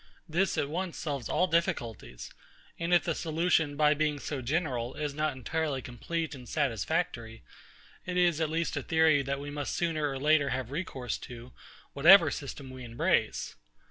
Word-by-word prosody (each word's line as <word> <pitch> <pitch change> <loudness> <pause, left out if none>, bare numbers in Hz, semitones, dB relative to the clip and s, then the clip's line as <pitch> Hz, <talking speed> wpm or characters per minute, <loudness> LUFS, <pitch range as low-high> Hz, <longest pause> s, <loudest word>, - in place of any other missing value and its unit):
This 175 +4 0
at 140 - +1
once 175 +3 -3
solves 140 -6 -4
all 180 - +3
difficulties; 165 - -2 0.5
and 170 +1 -2
if 175 -1 +5
the 165 - 0
solution, 160 -2 +1
by 150 0 +5
being 150 0 0
so 145 -1 -4
general, 130 -3 -1
is 150 -2 -3
not 155 +1 0
entirely 145 +2 -2
complete 155 +7 -4
and 125 -3 -10
satisfactory, 115 - -1 0.6
it 180 0 -2
is 175 -3 +3
at 160 - +1
least 165 +1 -1
a - - -1
theory 160 -3 +3
that 140 0 -3
we 145 +1 -6
must 145 -1 -3
sooner 155 -4 0
or 135 - -4
later 145 0 +3
have 130 -1 -3
recourse 140 -6 -4
to, 120 0 -10 0.4
whatever 165 +2 +7
system 140 -1 -6
we 130 -1 -9
embrace. 120 0 0
150 Hz, 170 wpm, -30 LUFS, 130-165 Hz, 0.6 s, whatever